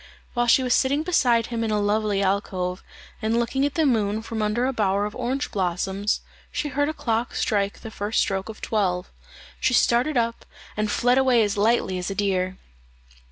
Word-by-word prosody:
While 240 -1 +1
she 260 +2 +5
was 250 -1 +2
sitting 280 +3 +2
beside 245 -10 +3
him 230 -1 -1
in 225 - -1
a 210 -1 +1
lovely 205 -1 +1
alcove, 190 -2 -1 0.4
and 220 +1 +1
looking 265 +4 +1
at 290 - -7
the 320 - +2
moon 220 -4 +1
from 225 -1 -4
under 215 +4 +1
a 265 - 0
bower 200 -3 +1
of 210 - -6
orange 255 +3 -2
blossoms, 190 +2 -1 0.3
she 295 - -2
heard 290 +2 0
a - - -2
clock 230 0 -1
strike 200 -2 0
the 225 - -8
first 205 +1 -1
stroke 195 +1 -1
of 220 - -9
twelve. 185 -4 -1 0.5
She 255 - +2
started 245 +6 +3
up, 230 0 0 0.3
and 215 0 -1
fled 245 +4 +3
away 255 -4 +4
as 205 -1 -1
lightly 205 -3 +1
as 180 - -3
a 195 - -4
deer. 185 -2 0
220 Hz, 195 wpm, -24 LUFS, 200-245 Hz, 0.5 s, she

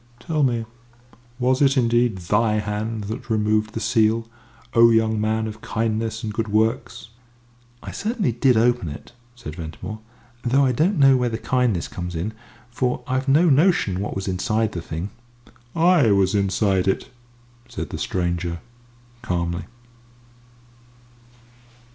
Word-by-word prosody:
"Tell 155 +5 -2
me 120 -4 +1 0.7
was 130 +1 +1
it 135 -1 +4
indeed 120 -3 +2
thy 105 +5 +1
hand 105 +1 -2
that 110 +5 -6
removed 110 0 +1
the - - -1
seal, 115 0 +2 0.5
O 115 0 +7
young 110 -1 +2
man 110 +1 0
of 110 0 -7
kindness 110 0 -2
and 105 -1 -3
good 110 0 -2
works?" 115 +2 -1 0.7
"I - - -6
certainly 215 - -1
did 125 +1 +3
open 120 -5 +2
it," 75 - -10 0.2
said 75 -11 -8
Ventimore, 85 +7 -7 0.4
"though 135 +3 +3
I 130 - +2
don't 165 - +1
know 135 -2 +6
where 125 -1 0
the 110 - -3
kindness 120 -8 0
comes 90 -1 -6
in 95 +7 -3 0.4
for 125 0 -1
I've 130 +1 -2
no 150 +6 +4
notion 145 - +3
what 100 - -3
was 95 0 -4
inside 110 +4 0
the 85 - -5
thing." 85 +4 -5 0.6
"I 165 -6 +4
was 100 -1 +3
inside 100 -1 +1
it," 95 +7 -1 0.6
said - - -6
the - - -5
stranger, 85 -1 -2 0.6
calmly. 85 -4 -2
110 Hz, 140 wpm, -22 LUFS, 100-125 Hz, 0.7 s, O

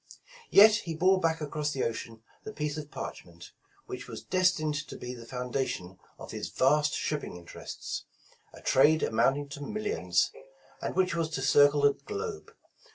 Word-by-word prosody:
Yet 215 +2 +8
he 170 -7 -5
bore 185 +3 +4
back 160 -2 0
across 150 0 -2
the 135 - -1
ocean 115 -1 -4 0.2
the 215 - -6
piece 150 -6 -3
of 150 -1 -6
parchment, 85 -9 -8 0.3
which - - -7
was - - -8
destined 180 -5 +2
to - - -8
be 125 0 -6
the 120 -2 -11
foundation 125 -7 -3 0.2
of - - -9
his - - -5
vast 150 +3 +2
shipping 150 -9 -3
interests, 85 -1 -7 0.5
a - - -14
trade 155 +4 +4
amounting 135 +6 +2
to 145 +1 -8
mil 215 +9 -4
lions, - - +1 0.5
and - - -3
which 185 -2 +2
was 165 -1 0
to 135 - -3
circle 145 +1 +5
the 145 0 +5
globe. 425 - -6
150 Hz, 165 wpm, -29 LUFS, 130-170 Hz, 0.5 s, Yet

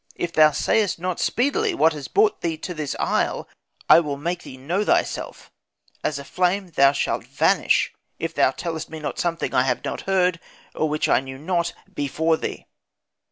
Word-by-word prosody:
If 170 -1 -3
thou 155 -1 +7
sayest 205 +6 +1
not 180 +1 -3
speedily 355 - +1
what 165 - +4
has 145 -3 -7
brought 415 0 +2
thee 165 -2 -2
to 180 +3 -6
this 150 -4 -4
isle, - - 0 0.4
I - - +8
will 145 -4 -3
make 170 +4 -3
thee 130 - -10
know 170 +10 -1
thyself; - - -1 0.5
as 150 - -1
a 140 - -6
flame 180 +3 0
thou 140 -2 +5
shalt 145 - -1
vanish, - - +2 0.2
if - - -4
thou - - +4
tellest 165 -3 -5
me 160 - -7
not 150 - -5
something 170 -1 -1
I - - +4
have 125 -1 -1
not - - -3
heard, 180 -3 +2 0.3
or 155 - 0
which 150 0 0
I - - +4
knew 130 0 -8
not, 170 +3 -1 0.2
before 160 +1 0
thee.' - - -5
165 Hz, 185 wpm, -23 LUFS, 150-180 Hz, 0.5 s, I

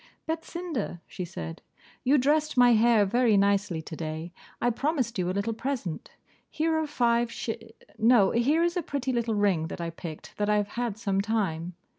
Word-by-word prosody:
'Betsinda!' 325 - -4
she 185 - -6
said, 80 - -7 0.4
'you 275 +4 +4
dressed 295 +2 +2
my 245 -1 +7
hair 225 -1 +5
very 230 +1 +3
nicely 200 -4 +1
today; 160 +1 -5 0.3
I 245 - +2
promised 260 - -1
you 180 0 0
a - - +1
little 200 +4 -1
present. 230 - -4 0.4
Here 320 +1 0
are 315 - -1
five 240 -4 +1
sh - - -5 0.5
no, 220 -3 +5
here 285 +8 +3
is 345 0 +1
a 355 - +1
pretty 275 -4 -2
little 235 -2 0
ring, 195 -6 +2
that - - -7
I 170 -1 -3
picked 165 -2 -9
that 210 0 0
I 210 - +4
have 205 -1 0
had 235 -3 -3
some 195 -3 0
time. 180 -6 -1
225 Hz, 180 wpm, -27 LUFS, 190-260 Hz, 0.5 s, my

